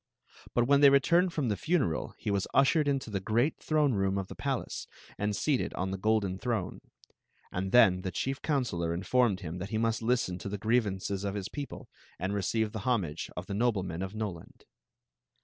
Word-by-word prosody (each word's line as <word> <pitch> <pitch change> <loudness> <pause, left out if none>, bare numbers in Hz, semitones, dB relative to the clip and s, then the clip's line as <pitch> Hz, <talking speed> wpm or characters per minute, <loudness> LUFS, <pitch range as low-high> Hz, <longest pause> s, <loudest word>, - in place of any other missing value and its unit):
Bu* 120 - +4
wb. 140 - +3
n 140 - +5
they 140 - +9
returned 170 +7 +4
from 145 -7 -1
the 105 - +1
funeral 155 - 0
he 105 - -3
was 100 -1 0
ushered 145 +2 +4
into 135 -5 -1
the 100 - -1
great 115 +9 +1
tl 155 -1 +2
loiic 135 - +1
room 95 -1 +1
of 95 -1 -3
the - - -8
palace - - -3 0.3
and 105 0 0
seated 140 +4 0
on 95 +1 -2
the 95 - -2
golden 100 -2 +1
th. - - -8
m 95 -5 -2
c; - - -33 0.6
and 95 +1 -3
then 95 -6 +6
the 95 - -3
chief 135 +8 -3
coun 145 -4 +1
selor 85 -7 -2
informed 100 +1 +2
him 85 +1 -5
tbit 95 +3 -5
kt 110 0 -1
mast 115 0 0
li^n 115 -6 0
to 100 - -5
^ 105 - -3
griev 110 +3 +2
aiccs 95 +1 -4
of 100 0 -2
his 100 0 -4
people 145 -1 -7 0.3
and 95 +3 -2
recdve 105 +2 0
the 110 - -5
homage 95 -9 -1
df 90 - -4
the 100 - -5
noyemen 95 -6 0
of 95 +2 -6
Noland. 100 -6 -6
105 Hz, 220 wpm, -30 LUFS, 95-125 Hz, 0.6 s, they